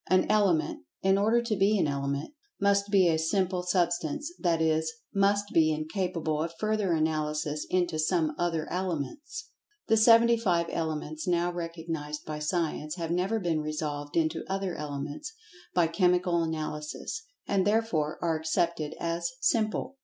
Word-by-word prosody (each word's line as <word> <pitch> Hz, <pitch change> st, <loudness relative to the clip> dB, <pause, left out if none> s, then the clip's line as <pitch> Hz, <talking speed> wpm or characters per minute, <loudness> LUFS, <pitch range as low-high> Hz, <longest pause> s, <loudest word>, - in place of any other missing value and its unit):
An 185 Hz, 0 st, +4 dB
Element 195 Hz, -, +2 dB, 0.2 s
(in 190 Hz, 0 st, +4 dB
order 225 Hz, +4 st, +3 dB
to 230 Hz, -2 st, 0 dB
be 205 Hz, +2 st, +3 dB
an 180 Hz, -, +2 dB
element) 140 Hz, -, -2 dB, 0.3 s
must 200 Hz, 0 st, +2 dB
be 195 Hz, -3 st, +5 dB
a 160 Hz, -1 st, +2 dB
"simple" 185 Hz, +2 st, +1 dB
substance, 175 Hz, -, 0 dB
that 170 Hz, -3 st, +1 dB
is, 160 Hz, 0 st, +1 dB, 0.2 s
must 200 Hz, +1 st, +2 dB
be 155 Hz, -1 st, +5 dB
incapable 155 Hz, 0 st, -2 dB
of 165 Hz, +1 st, -3 dB
further 215 Hz, -4 st, +1 dB
analysis 155 Hz, -1 st, -1 dB
into 175 Hz, -3 st, +1 dB
some 155 Hz, -1 st, +1 dB
other 165 Hz, -2 st, -1 dB
elements. 185 Hz, -, -4 dB, 0.4 s
The 225 Hz, -, +5 dB
seventy 230 Hz, +1 st, +6 dB
five 175 Hz, -7 st, +1 dB
elements, 155 Hz, -1 st, -3 dB
now 175 Hz, 0 st, +2 dB
recognized 165 Hz, -3 st, -5 dB
by 155 Hz, -1 st, -4 dB
science, 155 Hz, -1 st, -1 dB
have 165 Hz, -2 st, -3 dB
never 190 Hz, +6 st, +1 dB
been 165 Hz, -5 st, 0 dB
resolved 150 Hz, -1 st, -3 dB
into 160 Hz, 0 st, +1 dB
other 195 Hz, -1 st, -2 dB
elements, 145 Hz, -, -5 dB, 0.4 s
by 175 Hz, -2 st, +5 dB
chemical 175 Hz, 0 st, +2 dB
analysis, 155 Hz, -, -4 dB, 0.2 s
and 195 Hz, -1 st, +2 dB
therefore 205 Hz, -9 st, +1 dB
are 165 Hz, -2 st, +1 dB
accepted 160 Hz, -1 st, -1 dB
as 170 Hz, 0 st, -1 dB
"simple." 215 Hz, +7 st, 0 dB
170 Hz, 145 wpm, -29 LUFS, 155-195 Hz, 0.4 s, seventy